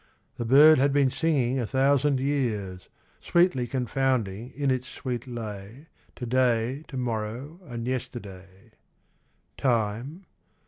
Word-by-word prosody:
The 120 - -3
bird 150 +5 +7
had 140 +1 +3
been 140 -2 +3
singing 135 -6 +1
a 120 - -2
thousand 140 +1 +2
years: 110 -10 -2 0.3
Sweetly 170 -8 +2
confounding 125 -3 -1
in 140 -1 0
its 130 0 -2
sweet 125 -2 -5
lay 115 +3 -8 0.3
To 125 - -6
day, 125 +2 +1
to 135 - -7
morrow, 120 +6 -4
and 120 -2 -5
yesterday. 100 -7 -7 0.9
Time 120 - -1
125 Hz, 120 wpm, -26 LUFS, 115-140 Hz, 0.9 s, bird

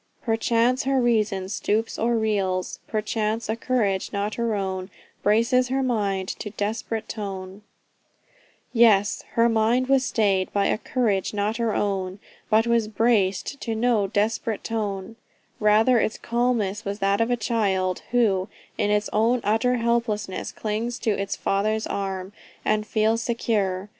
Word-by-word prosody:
"Perchance 235 +3 +1
her 270 0 +2
reason 215 -6 +1
stoops, 220 +2 -1
or 235 +1 +2
reels; 195 -4 -1
Perchance 215 +1 -1
a 220 - +1
courage 225 -6 0
not 205 +1 -2
her 235 -2 -1
own 190 -1 -3 0.3
Braces 230 +4 +3
her 265 +1 0
mind 200 -6 0
to 210 - -5
desperate 220 +2 -3
tone," 195 -2 -6 1.1
Yes, 215 -4 +4
her 230 0 +4
mind 230 +3 +2
was 270 -1 +4
stayed 200 -6 +1
by 200 -1 +2
a - - +1
"courage 215 -7 0
not 210 +2 0
her 230 -2 0
own," 190 -2 -1 0.3
but 220 +1 +4
it - - -2
was 230 -2 +2
"braced" 215 +3 +1
to 225 -2 -2
no 225 -3 +2
"desperate 210 +2 -1
tone;" 210 -1 -3 0.4
rather 220 +3 +4
its 220 - -1
calmness 230 -4 0
was 200 0 -3
that 200 +1 +1
of 230 - +1
a 245 - +1
child, 195 -6 0
who, 215 -5 +2 0.3
in 205 -2 +2
its 210 0 +1
own 230 +4 +3
utter 225 +4 +2
helplessness, 230 -4 -1
clings 225 +3 -3
to 225 - 0
its 195 -1 -2
father's 215 +2 0
arm, 195 -1 -4 0.3
and 215 0 +1
feels 220 +1 +1
secure. 205 -5 -1
215 Hz, 150 wpm, -24 LUFS, 200-230 Hz, 1.1 s, Yes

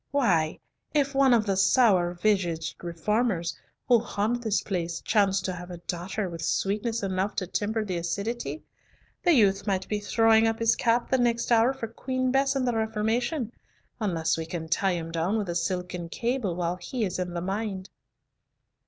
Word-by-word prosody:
Why, 175 - +2 0.4
if 280 -1 +2
one 270 -1 +4
of 230 -3 +4
the 195 -2 +1
sour 190 -4 +4
visaged 175 -5 0
reformers 175 +1 0 0.3
who 240 -2 +6
haunt 225 +1 -1
this 220 -3 0
place 170 -4 -2
chanced 200 -3 +2
to 185 - -1
have 180 0 -8
a 175 - -7
daughter 180 +4 -4
with 170 -2 -7
sweetness 210 +6 -1
enough 190 +1 -1
to 185 - -1
temper 215 +4 -1
the 185 -3 -2
acidity, 205 - -3 0.6
the 350 -2 +4
youth 200 -5 +3
might 190 -1 0
be 210 - -1
throwing 225 +1 +4
up 225 0 0
his 230 0 +3
cap 235 0 +1
the 260 - +3
next 235 0 +1
hour 230 +2 +5
for 265 -4 -5
Queen 255 +2 -2
Bess 270 +1 +2
and 260 -2 0
the 245 - +1
Reformation, 225 +4 -1 0.5
unless 165 -7 0
we 160 - -4
can 165 -2 -5
tie 185 +4 +1
him 165 -1 -4
down 170 +6 0
with 205 -4 -2
a 170 - -2
silken 180 -1 -2
cable 235 -4 -1
while 175 0 -1
he 220 +6 -3
is 185 -1 -3
in 180 -1 -3
the - - -1
mind." 195 0 -3
205 Hz, 180 wpm, -27 LUFS, 180-230 Hz, 0.6 s, who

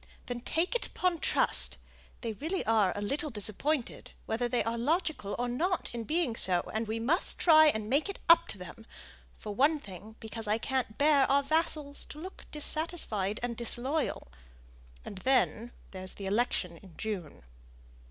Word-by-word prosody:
"Then 245 -1 -4
take 325 - 0
it 485 - +1
upon 360 -2 -1
trust. - - +4 0.4
They 230 -3 -3
really 320 - -3
are 215 -4 +3
a 205 - -3
little 295 +9 -1
disappointed, 230 +5 -2 0.2
whether 240 +2 -1
they 245 0 +1
are 230 +1 -2
logical 285 - -1
or 245 - -1
not 340 +10 -1
in 235 -1 -5
being 310 -6 0
so, 180 -5 +3
and 220 +1 -2
we 220 +1 -2
must 270 +11 +1
try 315 -2 +7
and 220 -7 0
make 280 - +1
it 395 - -4
up 335 0 +7
to - - -7
them; 185 +5 -11 0.5
for 210 - -6
one 285 +8 +3
thing, 210 - -11
because 225 0 -5
I 210 +1 +2
can't 250 -2 -2
bear 285 -2 +4
our 280 +1 +3
vassals 300 -1 -1
to 300 - -11
look 370 +4 -10
dissatisfied 300 - 0
and 240 -1 -2
disloyal, 245 - 0 0.8
and 195 - -7
then 240 -1 +1 0.2
there's 185 -1 -6
the 200 - -7
election 195 -4 -1
in 180 -2 -16
June." 185 - -5
240 Hz, 170 wpm, -30 LUFS, 215-305 Hz, 0.8 s, try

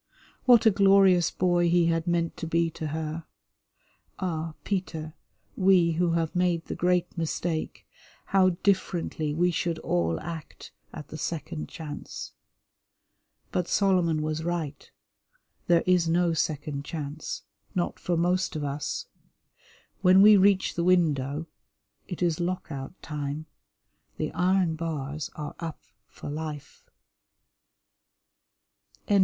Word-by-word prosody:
What 240 -2 +6
a 220 - +7
glorious 195 -3 +5
boy 175 -1 +2
he 175 0 +4
had 165 0 0
meant 170 -1 0
to 165 - -4
be 165 0 +1
to 155 - -5
her. 160 +1 -4 0.9
Ah, 165 -3 -3
Peter, 160 -5 -3 0.4
we 185 -3 +4
who 170 +1 +1
have 165 0 -1
made 180 -2 +1
the - - -4
great 180 0 +1
mistake, 165 -1 -3 0.4
how 190 -1 +4
differently 175 -5 0
we 175 +4 +2
should 170 0 -1
all 85 - 0
act 165 -2 -8 0.2
at 150 -2 -9
the 155 - -7
second 160 0 -4
chance. 150 -3 -7 1.2
But 180 -1 -1
Solomon 175 -6 +2
was 155 +1 -2
right; 165 -4 -3 0.8
there 170 -1 +4
is 180 -2 +3
no 170 0 +2
second 150 -2 -2
chance, 150 0 -5 0.3
not 175 -1 -1
for 175 -1 -1
most 180 +2 +1
of 150 - -2
us. 150 - -3 1.0
When 185 +1 +7
we 210 0 +9
reach 195 -1 +4
the 170 - -1
window 155 -4 +2 0.6
it 180 -1 -4
is 170 -2 +1
Lock 180 0 -2
out 135 +4 -7
Time. 150 0 -4 0.7
The - - -2
iron 180 -1 +2
bars 150 -2 -4
are 150 -1 -5
up 165 -2 -6 0.2
for - - -10
life. 155 - -7 2.2
XVII. 205 -2 +4
170 Hz, 125 wpm, -27 LUFS, 155-180 Hz, 2.2 s, we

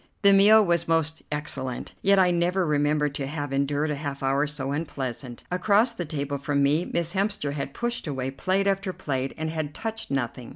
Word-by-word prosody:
The 200 0 +7
meal 210 +2 +7
was 170 -1 +1
most 160 -1 +1
excellent, 135 -4 -3
yet 195 0 +4
I 185 -2 +5
never 175 +2 +1
remember 150 0 +2
to 140 -1 -4
have 145 -1 -4
endured 145 +2 0
a - - -1
half 140 -1 -5
hour 135 +2 +2
so 140 -2 -4
unpleasant. 130 -5 -5
Across 205 +6 +3
the 175 -6 -4
table 145 -2 -3
from 140 0 0
me, 150 +5 +2
Miss 170 0 -1
Hemster 195 -7 -1
had 140 -1 -5
pushed 240 -5 -2
away 130 -2 -3
plate 190 +8 0
after 195 -1 0
plate 135 -4 -3
and 160 0 -3
had 155 -2 -4
touched 225 0 -4
nothing. 125 -3 -3
150 Hz, 195 wpm, -26 LUFS, 140-185 Hz, -, The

